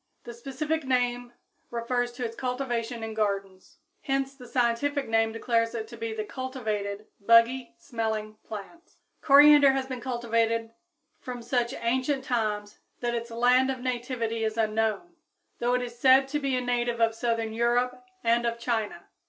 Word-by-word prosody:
The 235 - -8
specific 280 +6 -3
name 245 -2 0 0.4
refers 240 +1 -1
to 245 0 -4
its 230 0 -5
cultivation 245 -2 -3
in 220 0 -4
gardens. 195 - -3 0.2
Hence 270 -1 -1
the 255 -3 -13
scientific 255 +4 0
name 225 0 +2
declares 230 0 0
it 220 -1 -4
to 235 - -9
be 230 -1 -4
the 220 -1 -3
cultivated 215 -6 -4
buggy 230 +4 +4
smelling 220 -2 -3
plant. 220 - -10 0.3
Coriander 285 -1 +7
has 265 -1 -1
been 255 -2 -6
cultivated 230 -2 0 0.5
from 245 -2 -7
such 245 +1 0
ancient 260 +3 0
times 215 -5 -2 0.2
that 240 -1 -1
its 235 0 -3
land 250 +3 +3
of 260 -1 -2
nativity 240 -2 -2
is 220 0 -1
unknown, 220 - -1 0.4
though 245 +1 +1
it 250 - 0
is 240 -1 -8
said 265 +1 +6
to 295 +1 -1
be 275 -2 0
a 250 - 0
native 240 -1 -1
of 225 -1 +3
southern 225 -1 -1
Europe 245 +2 +1 0.2
and 235 +1 +2
of 235 0 -2
China. 225 -6 -3
240 Hz, 160 wpm, -27 LUFS, 225-255 Hz, 0.5 s, Coriander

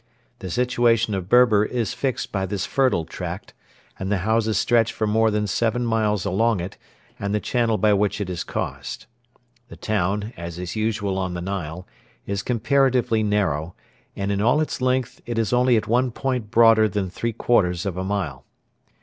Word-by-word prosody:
The 95 - -6
situation 115 0 +2
of 95 -2 -4
Berber 120 -4 +5
is 115 -1 -2
fixed 135 -3 -2
by 95 -1 -1
this 95 0 -2
fertile 130 - +1
tract, 90 +2 -7 0.5
and 95 +1 -3
the 105 - +2
houses 110 -1 +1
stretch 115 -1 +3
for 110 - -2
more 110 +1 +3
than 105 0 0
seven 115 +4 0
miles 110 -3 0
along 110 +2 +1
it 90 +2 -5 0.4
and 100 +1 -1
the - - +1
channel 115 0 0
by 105 -1 +3
which 100 +1 +1
it 100 - -2
is 90 -2 -3
caused. - - -5 0.6
The - - -11
town, 105 +2 -1
as 85 0 -7
is 90 +2 -5
usual 110 -3 -1
on 90 -2 -2
the - - -3
Nile, 90 -2 -5 0.4
is 100 0 -2
comparatively 125 0 +2
narrow, 95 -6 0 0.4
and 100 0 -2
in 100 0 0
all 125 +7 +3
its 155 -4 -2
length 130 -1 0
it 120 -1 -3
is 115 0 0
only 125 -1 +4
at 110 - -1
one 125 +3 +2
point 125 -3 -3
broader 115 -1 +5
than 100 0 -2
three 115 +4 -2
quarters 90 -7 +1
of 95 -3 -2
a 95 - -3
mile. 90 -10 -3
105 Hz, 185 wpm, -23 LUFS, 95-115 Hz, 0.6 s, Berber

